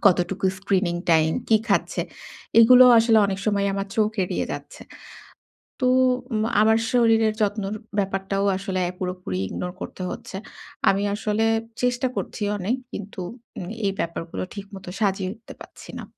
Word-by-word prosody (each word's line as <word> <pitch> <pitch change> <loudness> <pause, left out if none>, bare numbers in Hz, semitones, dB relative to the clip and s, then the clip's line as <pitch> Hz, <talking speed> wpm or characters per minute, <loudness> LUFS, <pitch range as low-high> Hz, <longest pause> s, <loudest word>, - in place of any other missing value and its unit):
কতটুকু 190 +1 +2
screening 190 -3 0
time 160 -1 +4 0.2
কি 220 - +6
খাচ্ছে? - - +1 0.6
এইগুলোও 250 +2 +9
আসলে 225 -1 +5
অনেক 195 -1 -3
সময় 200 -1 +2
আমার 195 0 -2
চোখ 215 -1 +3
এড়িয়ে - - -2
যাচ্ছে। - - -8 1.0
তো 255 - +2 0.5
উম 215 0 +1 0.2
আমার 220 +1 +5
শরীরের 225 -3 +4
যত্নর 205 -1 0 0.3
ব্যাপারটাও 195 0 -1
আসলে, 190 -1 -2 0.2
পুরোপুরি 180 - -4
ইগনোর 180 - -5
করতে - - -7
হচ্ছে। 190 - -7 0.5
আমি 195 +1 +2
আসলে, 215 +1 0 0.4
চেষ্টা 250 +1 +1
করছি 210 - -4
অনেক। 205 +6 0 0.2
কিন্তু, 200 -1 -6 0.4
উম 175 - -5 0.2
এই 195 - +2
ব্যাপারগুলো 170 +1 -3
ঠিক 200 -1 -7
মতো, 190 -2 -9
সাজিয়ে 195 -2 0
উঠতে 225 0 -13
পারছি - - -12
না। - - -6
200 Hz, 145 wpm, -24 LUFS, 190-220 Hz, 1.0 s, এইগুলোও